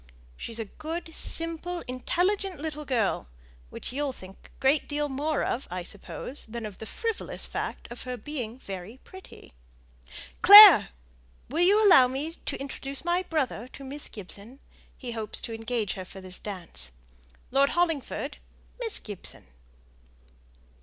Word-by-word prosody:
She's 230 - -5
a 225 - -3
good, 325 - -6
simple, 330 +2 -2
intelligent 360 +8 0
little 300 -1 -5
girl, 230 - 0 0.4
which - - -7
you'll 285 0 -1
think 190 -4 -12
a - - -20
great 275 +3 +2
deal 295 0 0
more 290 +3 -1
of, 260 - -2
I 180 0 -4
suppose, 205 +8 -5
than 230 0 -6
of 210 -3 -8
the 220 - -8
frivolous 455 -1 -3
fact - - -5
of 240 - -7
her 250 -1 -5
being 250 -5 -6
very 195 0 -8
pretty. 375 - -14 0.9
Clare! 410 -3 +11 0.6
will 310 +7 0
you 415 +4 +5
allow 265 -10 +8
me 275 +5 -3
to 330 - -6
introduce 275 +1 -6
my 350 +1 +2
brother 280 - -2
to 275 - -10
Miss 280 +2 -6
Gibson? 205 +5 -9 0.4
he 250 -3 -6
hopes 220 -2 -2
to 230 - -5
engage 225 -2 -2
her 190 - -6
for 190 - -11
this 185 -1 -8
dance. 185 - -6 0.6
Lord 275 +2 +4
Hollingford, 330 -5 -1 0.4
Miss 455 -4 -1
Gibson!" 205 -4 -4
270 Hz, 145 wpm, -27 LUFS, 225-325 Hz, 0.9 s, Clare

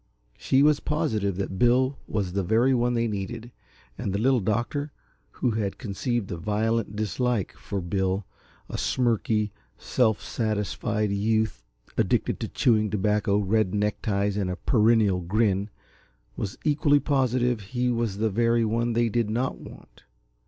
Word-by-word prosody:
She 135 +1 +2
was 150 0 +4
positive 105 - -1
that 95 0 -4
Bill 130 +3 +3
was 100 -4 -2
the 100 - +1
very 115 +8 +3
one 120 0 +1
they 115 0 +1
needed, 110 +3 -5 0.5
and - - -2
the 100 - -1
Little 125 +4 +3
Doctor, 120 +8 -1 0.4
who 125 - -1
had 105 -3 -2
conceived 120 -1 -3
a 85 - -3
violent 105 +3 -1
dislike 110 0 -1
for 100 - -5
Bill, 95 +2 -1 0.4
a - - -5
smirky, 110 -3 +1 0.3
self 110 -5 +1
satisfied 105 -1 -2
youth 110 - 0 0.4
addicted - - +1
to - - -3
chewing 110 -3 +2
tobacco, 105 0 +1
red 105 -1 +1
neckties 105 -1 0
and 100 -3 -1
a 90 - -2
perennial 110 -3 +3
grin, 100 +2 +1 0.7
was 95 - -4
equally 145 -1 +3
positive 125 -4 +1
he 125 +5 -1
was 115 -4 -1
the 110 0 0
very 115 +2 +2
one 115 +2 0
they 120 +1 +2
did 115 -1 0
not 120 +4 -1
want. - - -14
110 Hz, 145 wpm, -26 LUFS, 100-120 Hz, 0.7 s, was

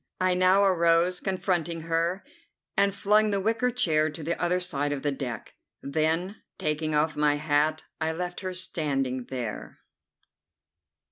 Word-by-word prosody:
I 185 0 +2
now 185 +2 +4
arose, 170 -1 +3
confronting 175 -3 -1
her, 165 +3 -1 0.5
and 200 -1 +2
flung 210 +2 +3
the 200 -1 +1
wicker 225 +5 +1
chair 160 -11 +2
to 155 +1 -8
the 170 +3 -1
other 175 +1 +1
side 145 -5 -2
of 145 -2 -3
the 145 - +1
deck. 125 -5 -5 0.3
Then, 160 +7 0 0.2
taking 155 0 -1
off 155 +1 +1
my 150 0 +3
hat, 150 +1 +1 0.2
I 160 0 0
left 175 +2 -4
her 185 -1 -5
standing 135 -8 -1
there. 120 -4 -6
165 Hz, 145 wpm, -27 LUFS, 150-185 Hz, 0.5 s, now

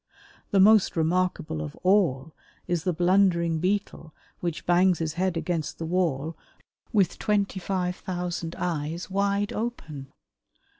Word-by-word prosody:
The 195 - +2
most 210 +1 +5
remarkable 165 - 0
of 75 -1 -6
all 160 -7 +2 0.3
is 175 -2 -1
the 180 - +2
blundering 175 -1 +2
Beetle 185 -3 -2 0.2
which 170 -2 -4
bangs 180 0 +4
his 160 -2 -2
head 180 0 -1
against 165 -2 -2
the 165 - -4
wall 165 -3 -1 0.6
with 195 -7 +1
twenty 200 -2 0
five 180 -1 -2
thousand 175 -2 -4
eyes 165 +1 -3
wide 200 +2 0
open. 160 - -5
180 Hz, 130 wpm, -26 LUFS, 160-190 Hz, 0.6 s, most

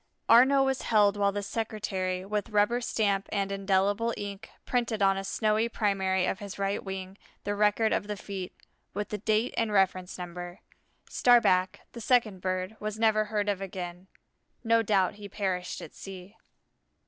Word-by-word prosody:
Arnaux 265 +4 +6
was 265 -1 0
held 210 -2 +3
while 200 -1 +2
the 205 0 -3
secretary, 195 -4 -3
with 210 +2 -2
rubber 210 +3 +2
stamp 200 -4 0
and 200 -1 -1
indelible 200 +3 +1
ink, 200 -1 -6 0.2
printed 235 -3 0
on 195 -1 +4
a 195 - -3
snowy 215 +3 +1
primary 190 -4 +1
of 190 - -2
his 200 -2 -7
right 200 0 -1
wing 190 0 -6 0.2
the 205 - -1
record 210 +2 +2
of 205 - -1
the 210 -1 -4
feat, 190 -2 -6 0.4
with 205 0 -3
the 210 - -4
date 215 +4 +1
and 225 -2 +1
reference 185 -2 +1
number. 175 0 -7 0.5
Starback, 190 -7 +3
the 235 - -9
second 225 -5 +2
bird, 185 +2 -2 0.2
never 220 -1 +3
was 215 - -4
heard 210 -1 -1
of 200 -2 -1
again. 180 -1 -6 0.6
No 230 0 +4
doubt 205 -2 +1
he 205 - -8
perished 190 -3 -3
at - - -10
sea. 190 +1 -10
200 Hz, 165 wpm, -28 LUFS, 190-215 Hz, 0.6 s, Arnaux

